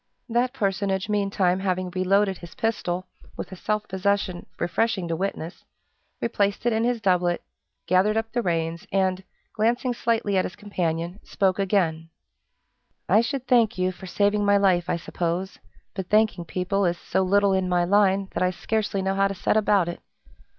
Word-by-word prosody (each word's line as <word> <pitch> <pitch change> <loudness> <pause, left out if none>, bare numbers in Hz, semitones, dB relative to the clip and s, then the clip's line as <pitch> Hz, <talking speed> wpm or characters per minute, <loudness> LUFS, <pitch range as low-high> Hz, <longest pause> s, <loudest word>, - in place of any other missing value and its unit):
That 240 +1 +1
personage 200 -4 -1
meantime 195 -3 +1
having 185 -1 -1
reloaded 190 +1 +1
his 170 - -11
pistol, 185 -5 -1 0.3
with - - -6
a - - -6
self 210 +3 -2
possession 190 -1 -1
refreshing 195 +1 0
to 165 - 0
witness, 180 -1 -4 0.6
replaced 205 -2 0
it 240 - +3
in 220 +1 +1
his 240 0 +1
doublet, 180 -4 +1 0.4
gathered 190 +4 +3
up 225 0 -2
the 240 - 0
reins, 165 -3 -2
and, 190 -1 +1 0.3
glancing 240 +3 +1
slightly 230 -4 0
at 185 - +3
his - - -6
companion, 175 -3 -3
spoke 190 -1 0
again, 170 -5 0 1.0
"I 210 +4 +5
should 260 +2 -3
thank 235 -7 +3
you 185 0 +1
for 185 +1 -11
saving 205 +2 +1
my 205 0 +4
life, 185 -3 +2
I - - +2
suppose, 175 +2 -3 0.3
but 190 -2 -5
thanking 210 -5 +2
people 190 +4 -1
is 175 -2 +1
so 190 - -1
little 200 +1 +3
in 190 -1 0
my 175 -1 +2
line, 195 +1 +3
that - - -3
I 185 - +3
scarcely 205 +1 -2
know 190 0 0
how 195 0 +3
to 195 - -4
set 180 - 0
about 205 -4 +3
it. 175 - -5
195 Hz, 170 wpm, -25 LUFS, 180-210 Hz, 1.0 s, I